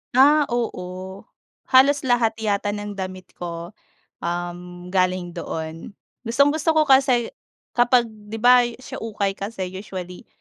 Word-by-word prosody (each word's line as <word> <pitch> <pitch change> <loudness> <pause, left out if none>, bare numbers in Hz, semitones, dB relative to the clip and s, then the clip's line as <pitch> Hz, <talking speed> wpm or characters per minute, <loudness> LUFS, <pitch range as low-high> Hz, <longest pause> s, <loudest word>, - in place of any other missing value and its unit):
Ah, 290 +2 +6
oo 190 -5 -4 0.4
halos 275 +2 +5
lahat 240 -2 +3
yata 205 -1 0
ng 205 -1 -5
damit 185 -1 -6
ko, 170 +2 -7 0.4
um, 175 +1 -5
galing 185 -1 +1
doon. 160 +3 -6 0.3
Gustong-gusto 290 +6 +2
ko 310 - +5
kasi 265 -4 +4 0.4
kapag 245 0 +4
di 210 0 -12
ba, 245 0 +6 0.2
sa - - -7
ukay 205 -3 -2
kasi 195 -3 -4
usually, 185 -2 -8
205 Hz, 120 wpm, -23 LUFS, 180-245 Hz, 0.4 s, Ah